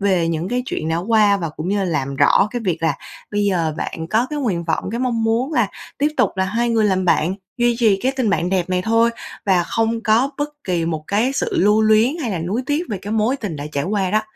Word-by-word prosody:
về 185 -4 +2
những 165 +2 -2
cái 250 +1 -1
chuyện 155 - -3
đã 160 - 0
qua 205 +2 +3
và 170 -4 -3
cũng 155 +4 -6
như 200 -1 0
làm 140 -6 -2
rõ 200 - +4
cái 245 0 -3
việc 170 -4 -1
là 160 -3 +2 0.4
bây 205 0 0
giờ 170 -6 0
bạn 160 0 -4
có 225 +3 +2
cái 300 - -3
nguyện 195 -11 -1
vọng, 165 +3 -2
cái 235 - -3
mong 235 -3 0
muốn 235 +6 0
là - - +2 0.3
tiếp 290 - +2
tục - - +3
là 190 - +1
hai 230 +5 0
người 225 -2 +2
làm 190 -2 +1
bạn, 175 +1 +2 0.2
duy 240 -1 +2
trì 220 -5 +4
cái 260 +1 +1
tình 235 -6 +1
bạn 175 -1 0
đẹp 185 -2 0
này 180 0 +1
thôi 230 +3 +3 0.4
và 185 -3 +4
không 225 +4 -1
có 235 +5 +3
bất 290 0 -1 0.2
kỳ 175 -3 0
một 160 -2 -3
cái 220 +6 +1
sự 275 - -1
lưu 210 +3 +4
luyến 220 +7 +3
hay 235 - -2
là 185 - -2
nuối 190 +10 -2
tiếc 295 +3 0
về 205 -5 -3
cái 205 +2 -4
mối 225 +5 +1
tình 195 - -5
đã 145 - -6
trải 140 0 -1
qua 195 -1 0
đó. 215 0 +2
205 Hz, 260 wpm, -20 LUFS, 175-230 Hz, 0.4 s, rõ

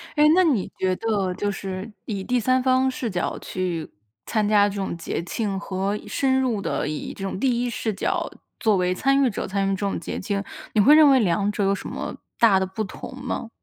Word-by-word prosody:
哎， 300 - +4
那 370 - +5
你 270 - +1
觉 185 -1 +1
得， 205 -5 0
就 205 +2 -1
是 195 +2 -5
以 200 -4 -3
第 250 +4 +1
三 255 +3 +2
方 260 0 +3
视 250 -2 -3
角 180 -3 -2
去 180 -3 -3 0.4
参 215 -2 0
加 205 -1 +4
这 200 - -7
种 195 -3 -3
节 170 - -3
庆， 195 +2 -2
和 195 +1 -2
深 265 +4 +1
入 235 -6 0
地 - - -1
以 150 0 -4
这 195 - -8
种 190 -1 -3
第 245 -1 +1
一 245 - -1
视 225 -1 -2
角 195 - -1 0.3
作 215 -4 +3
为 180 0 +1
参 275 +8 +2
与 260 - +3
者， 205 - -4
参 195 0 0
与 - - +1
这 - - -8
种 200 -1 -1
节 - - -5
庆， 200 0 -2 0.3
你 215 - +4
会 290 +8 +7
认 310 -2 +8
为 270 -1 +6
两 200 0 +1
者 205 - -1
有 195 0 +3
什 200 - -5
么 - - -5 0.2
大 210 -5 +5
的 190 - 0
不 190 +4 -4
同 205 +5 -8
吗？ 260 -3 -4
205 Hz, 245 characters per minute, -24 LUFS, 190-250 Hz, 0.4 s, 认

